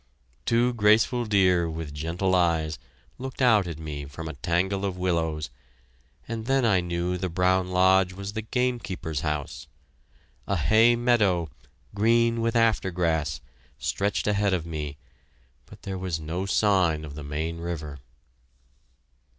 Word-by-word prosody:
Two 120 +1 +3
graceful 115 +3 +3
deer, 90 -5 +3
with 80 -2 -6
gentle 85 +5 -1
eyes, 80 -4 +1 0.4
looked 130 0 -7
out 110 -7 +4
at 85 -3 -5
me 75 -2 -6
from 75 +4 -8
a 80 - -5
tangle 90 +7 -1
of 95 -2 -2
willows, 80 -6 -1 0.8
and 115 0 -5
then 135 -2 +2
I 95 -5 +3
knew 85 +1 -2
the 90 0 -3
brown 90 +1 +2
lodge 95 0 +3
was 100 +2 -7
the 110 - -3
game 125 +2 -1
keeper's 80 -8 -4
house. 75 -3 -4 0.8
A 100 - 0
hay 110 +8 +4
meadow, 105 -9 +2 0.4
green 115 +2 +2
with 115 0 0
after 115 -4 +2
grass, 85 -4 -1 0.4
stretched 100 +1 -1
ahead 100 -2 +2
of 85 -3 -4
me, 75 -3 -5 0.7
but - - -15
there 95 -1 -4
was 90 -3 -2
no 85 +5 -4
sign 90 -7 +2
of 75 - -9
the 75 0 -8
Main 80 +3 -4
River. 80 -4 -5
90 Hz, 145 wpm, -26 LUFS, 80-105 Hz, 0.8 s, out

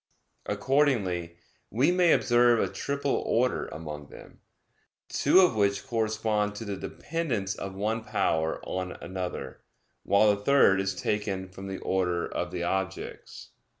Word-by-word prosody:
Accordingly 100 - +1 0.3
we 130 - +2
may 180 -2 +4
observe 120 -1 +4
a - - +2
triple 140 -1 -1
order 125 +2 +1
among 75 -2 -7
them, - - -14 0.7
two 165 +7 +5
of 180 - +4
which 100 -1 +1
correspond 110 -3 0
to 115 - -6
the 100 -1 -3
dependence 120 - -3
of 95 -1 -6
one 110 +3 -1
power 80 -6 0
on 90 -1 -3
another; 90 0 -6 0.4
while 100 +2 +4
the 100 - -10
third 100 -5 +5
is 95 -1 -2
taken 100 0 -2
from 95 +1 -9
the 95 0 -4
order 90 -2 0
of 90 - -3
the 90 -1 -4
objects. 95 +1 -4
100 Hz, 140 wpm, -28 LUFS, 95-120 Hz, 0.7 s, two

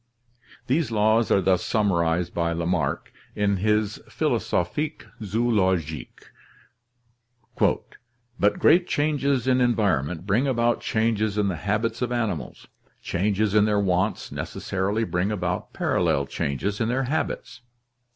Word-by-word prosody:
These 140 0 +1
laws 110 +1 +2
are 100 - +4
thus 95 0 +2
summarized 90 -5 +1
by 85 -1 0
Lamarck 85 -3 -1 0.2
in 100 -1 +1
his 105 +1 0
Philosophic 150 - -1 0.2
Zoolo 105 -3 +2
gique: 80 -1 -9 2.1
"But 105 0 +3
great 175 +1 +4
changes 140 -4 0
in 130 -1 +3
environment 90 - +1
bring 110 +7 +2
about 120 -2 +1
changes 110 -1 0
in 105 -1 +2
the 90 - -2
habits 105 +9 -1
of 125 -1 -1
animals. 105 - -3 0.4
Changes 105 +3 0
in 105 -1 +5
their 105 -1 +2
wants 95 +1 0
necessarily 100 +4 -2
bring 95 -1 -1
about 90 -3 -3
parallel 70 - +1
changes 70 - -3
in 110 - +1
their 130 +2 0
habits. 135 -1 -3
105 Hz, 120 wpm, -24 LUFS, 90-115 Hz, 2.1 s, in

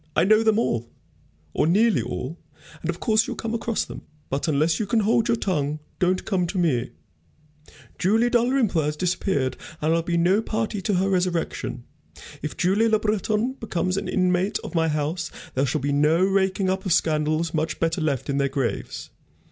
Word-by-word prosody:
I - - +4
know 215 +4 +5
them 220 -1 +3
all, 120 - 0 0.6
or - - +2
nearly 205 - +3
all, 125 - -5 0.4
and 165 - -4
of 170 - -2
course 220 0 +2
you'll - - -4
come 225 0 -4
across 230 -1 -1
them. - - -9 0.3
But 140 +5 -1
unless 155 +4 +2
you 215 - -1
can 220 +2 +2
hold 220 +1 +2
your 235 - +2
tongue, 150 -8 -1 0.2
don't 185 +1 +1
come 185 -4 0
to 190 - -4
me. 135 -9 +1 1.1
Julie 225 +6 +3
Dalrymple 240 -7 +2
has 150 0 -1
disappeared, 180 -6 0 0.2
and 155 +2 +1
I'll 165 - +2
be 170 +1 -1
no 185 +5 +3
party 215 -2 -2
to 200 +1 0
her 185 +2 +2
resurrection. 175 -9 -1 0.6
If 150 -3 -5
Julie 200 +6 +3
Le 220 - +4
Breton 215 +3 0
becomes 185 -4 -1
an 195 - -3
inmate 185 +2 +1
of - - -7
my 165 -1 +2
house, 155 +2 -1 0.2
there 135 +2 +1
shall 130 - -1
be 145 +1 0
no 150 +5 +3
raking 190 0 +1
up 190 +1 0
of 185 - +1
scandals 155 0 +1
much 160 0 -1
better 165 +1 0
left 145 -5 -1
in 140 -1 0
their 140 0 +1
graves. 135 -3 -3
180 Hz, 190 wpm, -24 LUFS, 155-210 Hz, 1.1 s, know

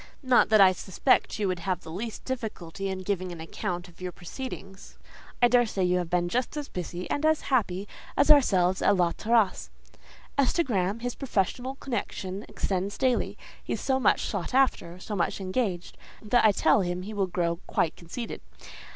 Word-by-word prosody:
Not 255 -2 +4
that 215 -1 +5
I 190 -1 +8
suspect 190 +7 +1
you 210 -2 0
would 185 -1 -1
have 185 +1 -2
the 160 - -10
least 215 +6 -5
difficulty 195 -7 -4
in 190 -1 -4
giving 185 -2 -2
an 170 - -8
account 175 +2 -4
of 175 0 -18
your 180 -1 -3
proceedings. 195 0 -8 0.5
I - - +9
daresay 240 -5 +2
you 180 0 +2
have 175 -2 -3
been 175 0 +1
just 250 - -1
as 295 -1 -4
busy 180 0 -5
and 290 - -1
as 315 0 +3
happy 200 -5 +1 0.3
as 285 +2 +5
ourselves 190 -10 +4
at 205 - +4
La 175 -2 +2
Terrasse. 225 -1 +1 0.7
As 270 - +3
to 340 - +2
Graham, 205 - -1
his 245 0 -2
professional 255 +1 -1
connection 205 -7 -4
extends 195 +1 -2
daily: 255 -2 +1 0.3
he - - -3
is - - -3
so 265 -1 +1
much 235 - +3
sought 200 +4 -3
after, 255 -10 +2
so 205 +3 -5
much 175 +1 0
engaged, 185 -2 -2 0.2
that 230 +3 +3
I 215 - +7
tell 205 - +3
him 180 0 -2
he 215 +3 -6
will 200 -2 0
grow 170 -1 -1
quite 160 - 0
conceited. 200 +8 -7
195 Hz, 185 wpm, -27 LUFS, 180-245 Hz, 0.7 s, I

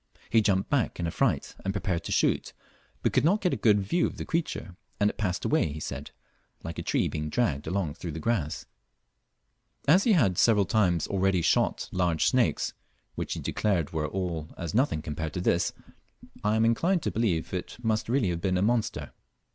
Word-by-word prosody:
He 110 0 +5
jumped 100 -2 +1
back 130 -9 0
in 85 - -1
affright 85 - 0
and 95 +1 -2
prepared 95 -4 -1
to - - -4
shoot, - - +1 0.5
but - - +1
could - - +3
not 185 +7 +3
get 180 -4 +1
a - - +2
good 105 -3 +4
vies 170 - +1
of - - -8
the - - -5
creature, 160 - -3 0.2
and 105 0 +3
it - - -26
passed 90 -4 -1
away, 80 - +2
he 80 - -6
said, - - -5 0.5
like 80 0 -5
a - - -2
tree - - +1
being 75 0 -3
dragged 75 - 0
along 90 -6 -1
through 85 0 -6
the 80 - -5
grass. 85 -6 -1 1.2
As 180 +7 +6
he 225 -4 +4
lead 95 - +2
several 105 -4 +4
times 90 -4 +2
already 95 -2 +1
shot 85 - +1
large 90 -3 +1
snakes, 125 -3 +2 0.4
which - - -3
he - - -5
declared 90 -8 0
were 75 -1 -1
all 85 -4 -3
as 85 -3 -4
nothing 115 - +1
compared 80 0 -4
with 90 - -2
this, 85 - +2 0.7
I 105 +1 +2
am 110 +1 +3
inclined 165 +10 +2
to - - -1
believe 95 -9 0
it 90 - -4
must 110 -1 0
really 120 -6 +2
have 85 -1 -2
been 90 0 +1
a 90 - +1
monster. 115 0 0
95 Hz, 200 wpm, -28 LUFS, 85-115 Hz, 1.2 s, As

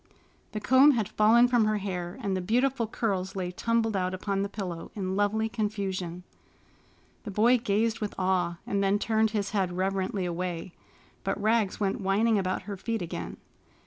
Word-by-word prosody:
The 215 - -2
comb 260 +7 +6
had 220 -6 0
fallen 230 +3 +5
from 240 -3 +3
her 215 0 +1
hair, 180 -3 -4
and 195 -2 0
the 185 - -1
beautiful 240 +4 +1
curls 195 -4 -2
lay 180 -2 -2
tumbled 225 +3 0
out 185 -1 0
upon 195 +1 -2
the 200 - -2
pillow 180 -5 -5
in 190 -2 -2
lovely 205 +2 +1
confusion. 195 -6 -3 1.0
The 215 - -6
boy 230 +5 +4
gazed 220 +1 0
with 210 -2 -4
awe, 185 -2 0
and 200 0 0
then 195 +1 +3
turned 220 +1 +1
his 205 -2 -2
head 190 -4 0
reverently 190 0 -1
away. 175 0 -4 0.5
But - - -2
Rags 215 -1 +1
went 200 0 -1
whining 205 +3 +2
about 185 0 -2
her 200 0 -6
feet 225 0 -3
again. 170 - -6
200 Hz, 175 wpm, -28 LUFS, 185-220 Hz, 1.0 s, comb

